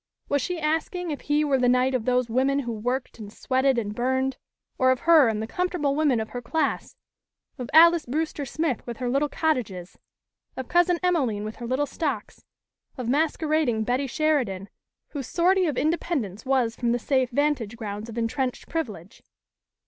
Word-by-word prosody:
Was 285 -1 +1
she 355 +6 -3
asking 325 +3 -1
if 290 - -5
he 295 +1 +1
were 275 -2 +2
the 250 -1 +3
knight 255 +1 +3
of 245 -4 -1
those 250 -1 +2
women 265 +4 +1
who 240 -3 -4
worked 245 +4 -3
and 205 -2 -8
sweated 260 +3 +1
and 210 -3 -2
burned, 260 +3 0 0.4
or 260 -1 +4
of 260 -1 +2
her 320 -5 +6
and 220 -1 -1
the - - -2
comfortable 345 0 -1
women 290 -6 +2
of 220 - -4
her 245 - -6
class, 320 +6 -2 0.6
of 250 - -5
Alys 335 -1 +6
Brewster 305 +2 -2
Smith 285 -1 -2
with 235 -2 -5
her 250 - -3
little 285 +3 +1
cottages, 220 - -2 0.6
of 260 -2 -5
Cousin 350 0 +3
Emelene 265 - +1
with 215 +1 -6
her 240 - -6
little 260 +4 0
stocks, 290 +1 -4 0.5
of 250 -3 -4
masquerading 305 -4 +1
Betty 250 +4 0
Sheridan 245 -10 0 0.4
whose 275 -5 -6
sortie 365 +1 +2
of 290 -5 -2
independence 280 - -1
was 250 -4 +1
from 235 -1 0
the - - +1
safe 260 +1 +1
vantage 255 -5 0
grounds 210 0 -6
of 230 - -8
entrenched 245 +2 -2
privilege? 210 - -5
260 Hz, 180 wpm, -25 LUFS, 235-305 Hz, 0.6 s, her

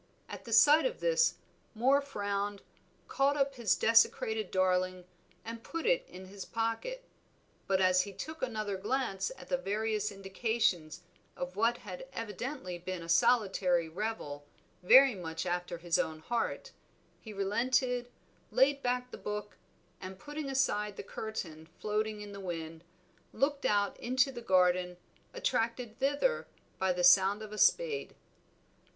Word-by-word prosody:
At 235 - -9
sight 300 - +7
of - - -6
this - - +2 0.4
Moor 265 +5 +4
frowned, 205 -6 -3 0.4
caught 280 +1 +1
up 275 -1 +1
his 235 -7 +1
desecrated 220 -2 +3
darling 185 -1 +1 0.4
and 230 0 -6
put 330 0 -5
it - - +2
in 185 +1 -10
his 195 +1 -8
pocket. 230 - -3 0.6
But 190 -1 +2
as 185 0 +5
he 200 +2 -6
took 315 +10 -7
another 215 -5 -2
glance 195 -3 -1
at 265 0 -13
the 270 - +1
various 215 -2 -1
indications 195 -4 -1 0.4
of 180 +1 -5
what 230 +3 +2
had 195 +5 -9
evidently 225 -3 -5
been 180 0 -5
a 165 - -10
solitary 180 -2 +3
revel 160 -5 -4 0.4
very 260 +8 +7
much 165 -4 -5
after 175 -1 -2
his 170 -1 0
own 160 - -1
heart, 240 - -2 0.5
he 220 - -10
relented, 245 +5 0 0.4
laid 275 +1 +3
back 250 0 -1
the - - -8
book, 210 0 -5 0.5
and, 185 0 -7
putting 295 +4 -6
aside 210 -6 0
the - - -5
curtain 165 -7 -6
floating 215 0 -2
in 205 -1 -8
the 200 - -8
wind, 165 -3 -6 0.5
looked 280 +1 0
out 205 -1 +1
into 255 +3 +1
the 240 -2 -8
garden, 180 -3 +2 0.3
attracted 240 - -2
thither 285 - +1 0.3
by 190 -1 +2
the 180 0 -1
sound 195 +3 +6
of 215 0 -9
a 210 - -5
spade. 470 -3 +2
215 Hz, 145 wpm, -32 LUFS, 185-260 Hz, 0.6 s, sight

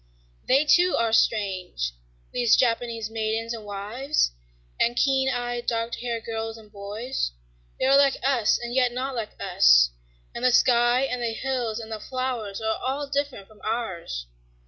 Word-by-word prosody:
They 270 +4 +4
too 350 +3 +4
are 230 -1 +1
strange, 185 - +1 0.4
these 240 -2 +4
Japanese 230 -2 0
maidens 225 +1 -2
and 225 -2 -7
wives 210 - -1 0.5
and 240 +1 +2
keen 265 0 +2
eyed, 245 -1 -3
dark 230 0 -1
haired 235 -2 -3
girls 225 0 -4
and 215 -2 -16
boys; 210 - -4 0.5
they - - +1
are 270 +1 +5
like 275 -1 +4
us 255 -5 +3
and 240 0 -6
yet 250 -1 +3
not 265 +2 -3
like 225 -4 -5
us; - - +5 0.4
and 235 - -6
the 255 - +5
sky 240 0 +4
and 250 -2 -1
the 230 -1 -1
hills 245 -3 -2
and 225 -1 -8
the 220 - -4
flowers 250 -5 -3
are 220 0 -1
all 270 +3 -2
different 280 -8 -2
from 215 -1 -20
ours. 190 - -3
235 Hz, 165 wpm, -25 LUFS, 220-255 Hz, 0.5 s, are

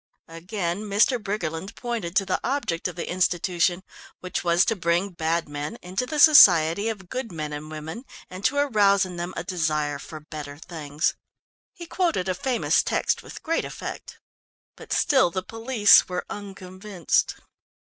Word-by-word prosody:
Again 175 +2 -4
Mr. 220 +4 +3
Briggerland 190 -3 -4
pointed 225 -8 -4
to 195 0 +3
the 185 - -1
object 240 -12 -1
of 180 - -7
the 175 - -5
institution 180 0 0 0.4
which 180 - -4
was 175 +1 +3
to 225 - +1
bring 175 +1 0
bad 165 0 -1
men 145 +9 -5
into 190 +8 -3
the 305 - -4
society 200 - +7
of 200 -5 -6
good 245 +2 -5
men 155 -3 -5
and 150 +1 -7
women, 155 - -7 0.2
and 185 +2 -10
to 285 - +2
arouse 205 -9 +3
in 180 -1 -8
them 175 +1 -4
a 165 - -3
desire 155 -5 -1
for 155 +2 -9
better 150 -2 -9
things. 150 -2 -2 0.6
He 355 -3 -10
quoted 330 - -1
a 185 - +1
famous 245 +6 +1
text - - -1
with - - -11
great 330 0 0
effect. - - -7 0.6
But - - -13
still 265 -11 +3
the 185 +1 -4
police 225 0 +4
were 180 0 -3
unconvinced. 190 -2 -2
185 Hz, 160 wpm, -24 LUFS, 165-215 Hz, 0.6 s, society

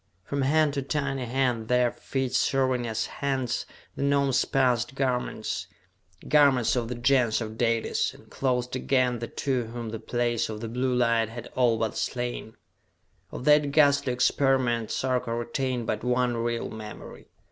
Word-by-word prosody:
From 140 +4 -2
hand 150 +2 +3
to 140 - -1
tiny 135 -2 -2
hand, 120 -2 0
their 125 0 +3
feet 130 -2 -3
serving 130 -3 +1
as 110 0 -1
hands, 135 -3 -2 0.3
the - - -5
Gnomes 140 -1 +2
passed 130 -1 +1
garments 130 -2 -2 0.6
garments 140 -5 +4
of 120 -2 -1
the 125 - -4
Gens 120 -2 +2
of 110 -1 -5
Dalis, 115 -1 0
and - - -17
clothed 125 -2 -1
again 130 -2 +1
the 115 - -4
two 130 -2 -1
whom 115 0 -6
the 110 0 -5
Place 120 0 -1
of 110 -1 -5
the 115 - -5
Blue 125 +2 0
Light 115 -2 +2
had 115 0 -8
all 120 -3 +3
but 110 -1 -2
slain. 120 0 -4 0.7
Of 125 - -7
that 150 -1 +5
ghastly 140 -3 +4
experiment 125 -2 +1
Sarka 125 -3 -1
retained 120 +1 -2
but 110 0 -2
one 125 0 +1
real 115 0 -2
memory.... 110 -1 -9
125 Hz, 160 wpm, -27 LUFS, 115-135 Hz, 0.7 s, that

